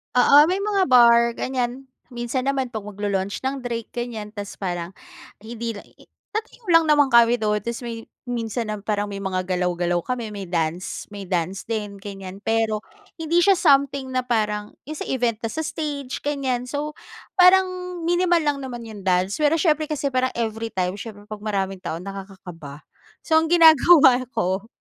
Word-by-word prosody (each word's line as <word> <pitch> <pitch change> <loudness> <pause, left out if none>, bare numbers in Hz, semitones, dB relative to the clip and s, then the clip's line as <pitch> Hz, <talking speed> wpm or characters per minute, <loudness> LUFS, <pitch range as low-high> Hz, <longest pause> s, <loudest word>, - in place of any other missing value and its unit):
Oo, 280 +4 +7
may 365 +5 +1
mga 400 -1 +1
bar, 235 -1 +6
ganyan. 255 +1 -3 0.2
Minsan 240 +1 -3
naman 270 -1 0
'pag 220 -4 -6
magla-launch 200 -1 -3
ng 270 -1 -4
drink, 235 -1 -5
ganyan. 240 -3 -4
Tapos 205 -1 -7
parang 175 -2 -3 0.5
hindi 230 +2 -5
lang 205 -2 -10
i-i - - -20 0.3
tatayo 445 +3 -5
lang 330 0 +7
naman 295 -2 +5
kami 235 0 +6
doon. 210 -1 +1
Tapos 235 +1 -4
may 230 -1 -6 0.2
minsan 230 -1 -3
nam 210 - -4
parang 205 -1 -1
may 200 -1 -6
mga 190 -2 -2
galaw-galaw 175 -1 0
kami. 240 -4 -4
May 200 -2 -7
dance 170 +1 -3
may 200 -1 -7
dance 180 +1 -2
din, 210 -3 -3
ganyan. 195 -1 -8
Pero 225 -1 0 0.4
hindi 325 +2 +2
siya 390 +2 +5
something 275 -5 +2
na 255 0 0
parang 210 -3 -1
'yong 305 +3 -7
sa - - -4
event 240 -4 0
na - - 0
sa 320 - -3
stage, 295 -4 -4
ganyan. 265 -4 -2
So, 290 +3 -3 0.5
parang 375 +1 +7 0.4
minimal 350 +1 +2
lang 290 -1 +1
naman 240 -3 -6
'yong 215 -3 -10
dance. 185 +4 +1
Pero 300 +1 +3
siyempre 310 -2 +1
kasi 280 -2 -1
parang 255 0 +1
everytime, 220 -5 -2
syempre 205 -1 -9
'pag 215 -1 -7
maraming 195 -3 -2
tao, 165 -2 -5
nakakakaba. 185 -6 -9 0.4
So 320 - +1
ang 320 - -1
ginagawa 315 -6 +7
ko, 195 -2 -1
235 Hz, 170 wpm, -23 LUFS, 200-275 Hz, 0.5 s, Oo